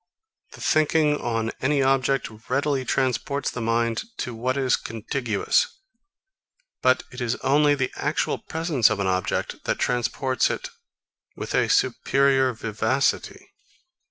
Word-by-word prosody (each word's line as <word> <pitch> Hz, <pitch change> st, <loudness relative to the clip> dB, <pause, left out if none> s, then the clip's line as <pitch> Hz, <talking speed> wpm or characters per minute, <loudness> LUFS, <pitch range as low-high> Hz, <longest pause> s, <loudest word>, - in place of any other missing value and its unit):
The -, -, -12 dB
thinking 155 Hz, -1 st, +2 dB
on 115 Hz, -1 st, -1 dB
any 140 Hz, +1 st, +2 dB
object 135 Hz, 0 st, +2 dB, 0.2 s
readily 140 Hz, +1 st, +1 dB
transports 135 Hz, +3 st, -1 dB
the 120 Hz, -, -5 dB
mind 115 Hz, 0 st, 0 dB, 0.2 s
to 125 Hz, -, -4 dB
what 125 Hz, +4 st, -2 dB
is 130 Hz, -2 st, +2 dB
contiguous; 115 Hz, -, -1 dB, 1.1 s
but 130 Hz, 0 st, +3 dB
it 125 Hz, -, -8 dB
is 120 Hz, 0 st, 0 dB
only 145 Hz, +2 st, +4 dB
the 130 Hz, -2 st, -1 dB
actual -, -, -1 dB
presence 160 Hz, -7 st, +1 dB
of 110 Hz, -2 st, -2 dB
an 100 Hz, -, 0 dB
object, 95 Hz, -1 st, -1 dB
that -, -, 0 dB
transports 125 Hz, +2 st, 0 dB
it -, -, -4 dB, 0.7 s
with -, -, -6 dB
a -, -, +2 dB
superior 135 Hz, -1 st, +3 dB
vivacity. 115 Hz, +3 st, -1 dB
130 Hz, 130 wpm, -24 LUFS, 115-140 Hz, 1.1 s, only